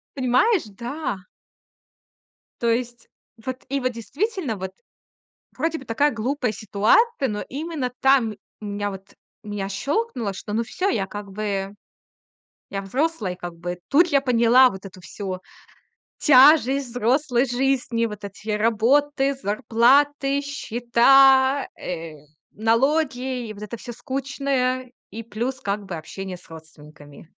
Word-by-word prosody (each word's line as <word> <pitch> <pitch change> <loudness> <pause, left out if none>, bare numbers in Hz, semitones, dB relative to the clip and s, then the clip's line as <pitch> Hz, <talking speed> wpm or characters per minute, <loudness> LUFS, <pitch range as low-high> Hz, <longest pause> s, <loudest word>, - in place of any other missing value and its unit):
Понимаешь? 275 - +3
Да. 240 +2 -4 1.4
То 235 - +1
есть 240 0 -3 0.4
вот 260 0 -5
и 275 0 -1
вот 255 0 -1
действительно, 285 - -3
вот 190 0 -6 0.8
вроде 325 0 -1
бы 265 - -12
такая 285 +6 +2
глупая 245 +1 -1
ситуация, 260 - +2
но 210 -1 -3
именно 285 -3 -4
там, 265 -5 +4
м - - -13 0.2
меня 205 -1 -3
вот 195 0 -11 0.3
меня 205 -2 -4
щёлкнуло, 245 - -2
что, 205 - -7
ну 230 +2 +1
всё, 370 - -2
я, 195 - 0
как 205 0 -8
бы 200 -1 -3 1.0
я 195 0 -3
взрослый, 230 - -1
как 175 -1 -8
бы. 175 +1 -5
Тут 335 +5 +5
я 280 -3 +3
поняла 250 0 +5
вот 190 -1 -9
эту 185 -1 -11
всю 190 0 -6 0.8
тяжесть 275 -2 +6
взрослой 245 +2 +1
жизни: 245 -2 0
вот 210 -2 -7
эти 200 +2 -9
работы, 270 +6 +2
зарплаты, 270 +5 +2
счета, 270 +1 +4
э, 165 -3 -5 0.4
налоги, 250 +1 0
вот 210 0 -10
это 220 +2 -6
всё 240 +2 -8
скучное, 260 -1 -2 0.2
и 225 +2 -7
плюс, 240 +4 -4
как 200 0 -3
бы 175 -2 -5
общение 185 +3 -7
с 175 - -21
родственниками. 150 -2 -14
240 Hz, 130 wpm, -23 LUFS, 205-275 Hz, 1.4 s, тяжесть